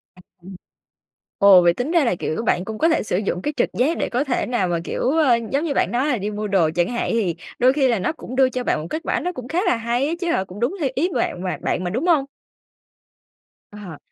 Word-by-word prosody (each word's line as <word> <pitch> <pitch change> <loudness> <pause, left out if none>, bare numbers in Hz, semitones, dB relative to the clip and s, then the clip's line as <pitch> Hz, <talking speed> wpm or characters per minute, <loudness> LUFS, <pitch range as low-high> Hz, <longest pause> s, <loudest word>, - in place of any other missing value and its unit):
À, 180 - -17 0.2
ừm. 190 +1 -10 0.8
Ồ, 200 -3 +8
vậy 170 -1 +4
tính 250 - -3
ra 335 -4 +3
là, 230 - +1
kiểu, 170 +4 -3
bạn 180 -5 0
cũng 220 0 -5
có 325 - +3
thể 325 - +1
sử 180 - -1
dụng 195 -3 -2
cái 295 +6 -2
trực - - +1
giác 285 +7 +1
để - - -2
có 250 +3 0
thể 270 -4 -1
nào 240 -7 0
mà, 170 -1 -1
kiểu, - - -4
ờ, 295 -6 +4 0.2
giống 280 +3 0
như 310 - -1
bạn - - +1
nói 255 +4 0
là 255 -6 +1
đi 205 +2 -3
mua 210 +1 -4
đồ 190 -6 +2
chẳng 175 +1 +1
hạn, 240 -1 -2
thì 200 -8 0 0.2
đôi 255 +2 +5
khi 275 -2 +2
là 235 -5 +1
nó - - -1
cũng 255 -5 -9
đưa 260 0 +4
cho 255 -1 -4
bạn 155 - 0
một 160 - -7
kết 320 - -3
quả - - 0
nó 360 - -2
cũng 255 -7 -8
khá 325 +7 -1
là - - +3
hay 235 +4 -1
á 320 - -2
chứ 350 - -2
hả? 190 - +1
Cũng 190 +2 -11
đúng 245 +11 0
theo 280 - 0
ý 340 +7 +1
bạn 180 - -2
mà 180 - -2
bạn 180 - -1
mà, 180 - -2
đúng 250 - -2
hông? 310 -6 +3 1.5
Ờ. 200 -7 -9
240 Hz, 275 wpm, -21 LUFS, 190-280 Hz, 1.5 s, Ồ